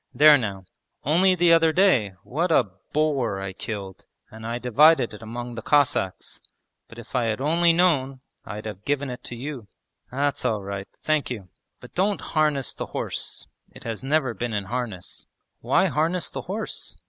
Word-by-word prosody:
There 150 0 +8
now, 100 -5 -4 0.4
only 180 +6 +4
the 175 -1 +5
other 165 -1 +5
day, 155 - +3
what 165 +7 -1
a 120 -10 +3 0.2
boar 140 -9 +1
I 95 -1 -5
killed, 100 -2 -7 0.2
and 110 0 -8
I 120 +1 -2
divided 125 +2 +4
it 105 - -10
among 120 +2 -6
the 115 - -6
Cossacks, 130 -9 +1 0.5
but 115 - -14
if 115 +1 -12
I 125 -3 +1
had 110 0 -1
only 165 +5 +3
known, 140 -7 +2 0.2
I'd 105 0 -7
have 105 -2 -7
given 140 0 -1
it 125 - -8
to 120 - -6
you.' 130 -3 -6 0.4
'That's 140 +2 -1
all 105 -3 0
right, 100 0 -5
thank 155 -3 -1
you! 105 -7 -6 0.3
But - - -14
don't 195 +3 +1
harness 150 -4 +1
the - - -5
horse, - - -4 0.2
it - - -14
has 115 +1 -5
never 135 -3 +1
been 115 +2 -3
in 100 -1 -2
harness.' 115 -8 -5 0.3
'Why - - +2
harness 165 +2 0
the - - -4
horse? 210 +5 -5
130 Hz, 175 wpm, -24 LUFS, 110-155 Hz, 0.5 s, There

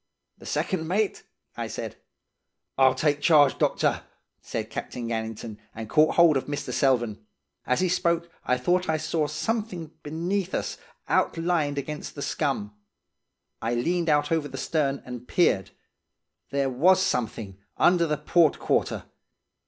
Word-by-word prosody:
"'The - - -11
second 165 -4 -1
mate?' 200 +4 0 0.3
I - - -3
said. - - -6 0.8
"'I'll 130 -1 +5
take 145 -1 +1
charge 145 -2 +5
doctor,' - - +1 0.4
said - - -5
Captain 120 -2 -5
Gannington, 110 -1 -4 0.2
and 110 0 -6
caught 155 +1 +4
hold 170 -4 +6
of 130 - -4
Mr. 145 0 -4
Selvern. 120 -6 +1 0.5
As 125 - +2
he 185 - +3
spoke, 170 -1 +1 0.2
I 125 - +1
thought 180 +8 +1
I 160 - +2
saw 155 0 -1
something 205 -6 -3
beneath 175 +5 -2
us, - - -3 0.3
outlined 165 -4 +1
against 150 +2 -5
the 140 - -4
scum. 115 -9 -1 0.9
I 115 +2 0
leaned 170 +7 0
out 145 0 +2
over 160 -3 +1
the 135 - -8
stern, 140 -1 -1
and 125 -1 -8
peered. 100 - +2 0.8
There 140 -1 0
was 180 +9 +5
something 110 - -2 0.2
under 175 -1 +4
the 150 -1 0
port 165 -1 +3
quarter. - - 0
150 Hz, 145 wpm, -26 LUFS, 125-170 Hz, 0.9 s, hold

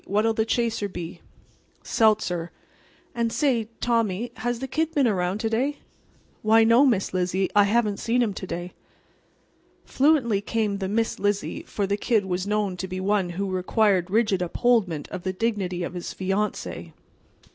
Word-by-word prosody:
What'll 215 +3 +2
the 220 0 0
chaser 225 -3 0
be?" 175 -2 -7 0.6
"Seltzer. 205 -6 +1 0.6
And 235 -1 -1
say, 240 -5 +1
Tommy, 230 -1 0
has 240 +2 -2
the 265 +3 -5
Kid 320 +5 -1
been 280 -3 +4
around 185 -2 0
to 225 - 0
day?" 270 +6 0 0.6
"Why, 220 +1 +5
no, 235 +5 +5
Miss 205 -8 +1
Lizzie, 185 +1 0
I 205 -1 +6
haven't 210 -1 +1
saw 230 - -2
him 240 -4 +2
to 190 - -7
day." 175 +1 -5 1.1
Fluently 260 -8 +2
came 210 -2 -1
the 190 -1 -2
"Miss 225 +2 0
Lizzie," 205 0 -1
for 205 - -2
the 200 +1 -1
Kid 215 -2 +1
was 185 +1 -2
known 205 -3 0
to 190 - -4
be 185 0 -5
one 195 -1 +1
who 195 -1 -2
required 185 0 +2
rigid 210 -2 +2
upholdment 180 -4 +1
of 185 - -6
the 185 +1 -3
dignity 190 -4 -1
of 175 - -5
his 175 -1 -5
fiancee. 195 +3 -3
210 Hz, 165 wpm, -25 LUFS, 185-230 Hz, 1.1 s, I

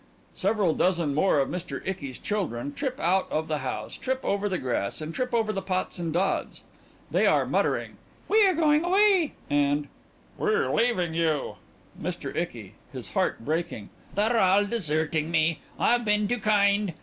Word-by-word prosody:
(Several 200 -7 +1
dozen 170 -5 +1
more 155 +3 +3
of 135 - +1
MR. 180 0 -4
ICKY'S 145 -9 -4
_children 145 - -3
trip 265 - -3
out 185 +3 +1
of 160 +1 -1
the 155 -1 -1
house, 130 -1 -4
trip 260 0 -2
over 200 +1 0
the 185 - -1
grass, 120 - -2
and 155 +1 -5
trip 250 +5 -2
over 225 -2 +1
the 195 - -2
pots 185 -1 -2
and 170 -2 -2
dods. 185 +4 -1 0.5
They - - +3
are - - +3
muttering - - -1 0.3
"We 435 +1 +5
are 375 - +2
going 305 -1 +3
away," 380 -2 +3
and 145 0 +1 0.5
"We 425 - 0
are 460 - 0
leaving 215 -8 +1
you."_) 160 -3 0 0.5
MR. - - -4
ICKY: - - -4 0.2
(His - - -8
heart 115 - -1
breaking) 160 -9 -2 0.3
They're 220 +3 +2
all 195 +1 +4
deserting 160 -7 -1
me. 165 -1 +2 0.2
I've 240 0 +3
been 210 -1 +2
too 245 +3 -1
kind. 205 -3 +2
190 Hz, 170 wpm, -26 LUFS, 155-225 Hz, 0.5 s, We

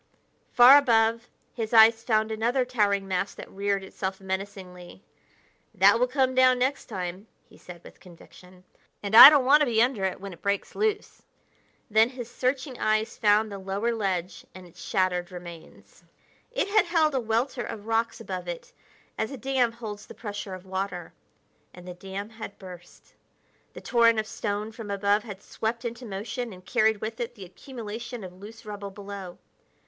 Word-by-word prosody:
Far 255 +4 +8
above, 230 -3 +1 0.2
his 225 -1 -5
eyes 225 0 +7
found 220 -1 +1
another 240 +4 0
towering 205 -5 0
mass 190 +1 -2
that - - -11
reared 200 0 -1
itself 190 0 -5
menacingly. 190 -1 -7 0.7
"That 200 +4 +5
will 250 - +3
come 260 0 +1
down 255 0 +5
next 260 +3 -1
time," 185 0 -6 0.2
he - - -20
said 175 -1 -13
with - - -15
conviction, 180 +1 -17 0.4
"and 200 +1 -4
I 240 +4 +14
don't 290 -4 +3
want 285 +3 +6
to 300 - +2
be 225 -2 +1
under 240 -4 +2
it 190 - -3
when 195 -1 -8
it 170 - -16
breaks 200 0 -2
loose." 425 -1 -2 0.7
Then 220 +2 +4
his 245 -2 -9
searching 255 +1 -2
eyes 215 +1 0
found 210 0 +2
the 200 - -6
lower 200 +5 -2
ledge 190 -5 -3
and 185 -1 -11
its 175 0 -16
shattered 180 0 -1
remains. 175 -2 -12 0.5
It - - -1
had 425 +1 +3
held 325 -3 +2
a 265 - +1
welter 240 +3 -1
of 210 -1 -8
rocks 225 +1 -1
above 185 -5 -6
it 175 -1 -7 0.5
as 220 - -1
a 275 - -7
dam 255 -1 0
holds 220 -3 -8
the - - -12
pressure 205 -3 -6
of 185 0 -13
water 190 -2 -5 0.6
and 180 0 -13
the 180 - -6
dam 195 +3 -7
had 220 -2 -9
burst. 180 -2 -14 0.6
The - - -10
torrent 230 -2 +3
of 215 - -2
stone 210 0 -4
from 220 -2 -9
above 200 +1 +1
had 205 -3 -9
swept 230 +2 -4
into 235 +1 -6
motion 220 +4 -5
and 185 0 -15
carried 220 -3 +1
with 225 +2 -5
it 240 0 -4
the 200 -4 -10
accumulation 235 +2 -8
of 180 -1 -9
loose 205 +5 -13
rubble 205 -1 -7
below. 195 -2 -9
215 Hz, 175 wpm, -26 LUFS, 190-240 Hz, 0.7 s, I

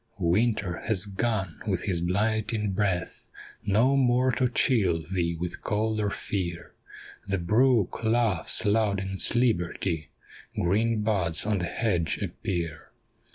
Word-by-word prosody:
Winter 95 0 +1
has 105 -4 +2
gone 100 -3 -2
with 95 -4 -1
his 90 -5 0
blighting 105 +3 0
breath, 95 -3 -2 0.4
No 115 +7 +3
more 130 -1 +3
to 125 +1 +1
chill 100 -9 +2
thee 85 0 -2
with 90 0 -5
cold 110 0 -1
or 105 - 0
fear, 85 -4 -4 0.5
The 100 0 0
brook 110 +5 +2
laughs 110 -4 +2
loud 105 -1 +2
in 95 0 -4
its 95 +4 +1
liberty, 90 - 0 0.5
Green 105 +5 +1
buds 95 -7 0
on 105 -2 +1
the 85 - -1
hedge 85 -4 -1
appear. 85 -4 -4
100 Hz, 130 wpm, -27 LUFS, 90-110 Hz, 0.5 s, No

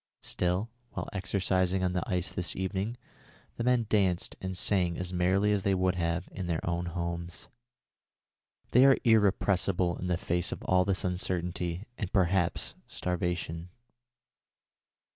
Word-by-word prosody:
Still, 90 +6 -1 0.2
while - - -4
exercising 95 -1 +1
on 90 -1 +1
the 90 - 0
ice 90 0 -1
this 90 -3 -2
evening, 95 +5 -2 0.6
the 115 - -2
men 125 -1 +3
danced 95 -4 +1
and 95 -1 -4
sang 90 -4 +1
as 90 0 -4
merrily 95 +4 +2
as 105 -1 +2
they 95 0 +2
would 90 0 +2
have 85 0 -1
done - - -17
in 90 - -3
their 85 0 -2
own 85 0 -1
homes. 85 0 -4 1.2
They 125 - +6
are 135 - +6
irrepressible 100 -5 +3
in 90 - -3
the 90 -1 +1
face 85 0 0
of - - -5
all 90 0 +3
this 95 -3 0
uncertainty 90 0 -2
and 100 -4 -3
perhaps 95 -2 +1
starvation." 90 -1 -3
90 Hz, 145 wpm, -30 LUFS, 90-95 Hz, 1.2 s, They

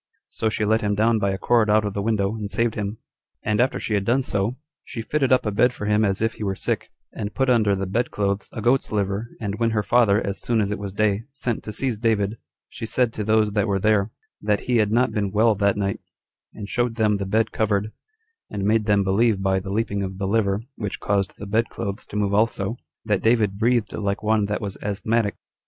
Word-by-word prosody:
So 110 - -1
she 110 0 -1
let 110 +2 +2
him 105 -1 0
down 110 +2 +3
by 100 - +1
a 95 - -1
cord 115 +2 +2
out 105 0 +4
of 100 - -2
the 100 - -2
window, 105 -2 0
and 105 -2 -5
saved 115 +2 +1
him: 105 0 -3 0.5
and 105 +1 +2
after 130 - +1
she 110 - -3
had 100 -1 +1
done 125 +6 +2
so, 105 +1 -1 0.3
she 115 - -6
fitted 135 +2 0
up 130 - +4
a 105 - 0
bed 120 +4 +3
for 105 - -6
him 105 +1 +3
as 100 +1 0
if 115 - +1
he - - -7
were 95 -1 -1
sick, - - -2 0.2
and 105 - -5
put 130 -1 +2
under 105 -5 +3
the 95 0 -2
bed 115 +6 0
clothes 100 -1 -1
a 110 - -6
goat's 125 +3 +2
liver 100 +2 -1
18 110 - -7
and 100 +2 -3
when 115 -1 +2
her 110 -2 0
father, 105 -1 +4
as 100 -3 -4
soon 115 -2 +1
as 105 -1 0
it 105 - -3
was 100 -1 -5
day, 105 +1 0
sent 125 -4 -3
to 105 - -6
seize 115 0 -2
David, 110 -2 0 0.3
she 115 - -7
said 120 0 +1
to 105 - -3
those 110 0 +2
that 105 0 +1
were 100 -1 +1
there, 105 0 +2 0.3
That 105 -1 +1
he 125 -1 +1
had 105 -2 +2
not 120 +1 +3
been 105 -2 -1
well 110 +3 +3
that 100 0 +1
night, 100 -1 -1 0.6
and 105 -2 -7
showed 120 +1 -1
them 105 -2 +2
the 100 -1 -4
bed 110 +3 +1
covered, 105 -1 0 0.6
and 100 -2 -4
made 110 +1 +2
them 105 -2 +3
believe, 100 +1 +2
by 95 0 +2
the 95 +1 -7
leaping 100 -1 -1
of 95 -1 -4
the 100 - -2
liver, 100 0 +1
which 105 -3 -4
caused 100 -1 -1
the 105 - -7
bed 110 +3 +1
clothes 100 +1 -5
to - - -10
move 100 -1 0
also, 105 0 +1 0.3
that 105 -3 +1
David 110 -4 +2
breathed 115 -3 +1
like 100 0 -2
one 110 -1 +2
that 105 +1 -2
was 100 -2 -5
asthmatic. 105 +1 0
105 Hz, 245 wpm, -23 LUFS, 100-115 Hz, 0.6 s, out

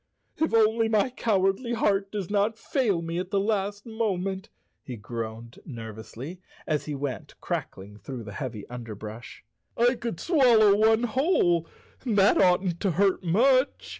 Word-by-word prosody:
"If 320 - +1
only 225 0 +3
my 220 +3 +2
cowardly 210 +1 0
heart 195 -3 +1
does 205 -3 -4
not 210 +2 +1
fail 220 -9 0
me 165 +1 -3
at 185 0 -4
the 200 - +1
last 205 0 -1
moment," 195 -4 -2 0.3
he 125 - -7
groaned 115 +1 -7
nervously, 115 - -8 0.2
as 155 -2 -1
he 150 - -4
went 135 -3 -5
crackling 100 +2 -5
through 125 +3 -7
the 105 - -9
108 - - -10
Chapter 125 -1 -5
Eight 105 - -8
heavy - - -13
underbrush. 110 -1 -8 0.3
"I 240 +2 +4
could 235 -8 -5
swallow 235 - +5
one 220 +2 +3
whole, 220 - +2 0.4
and 230 -5 -1
that 200 +1 +5
oughtn't 180 -1 +2
to 195 - 0
hurt 195 +2 +2
much." 255 - +2
195 Hz, 165 wpm, -26 LUFS, 140-225 Hz, 0.4 s, swallow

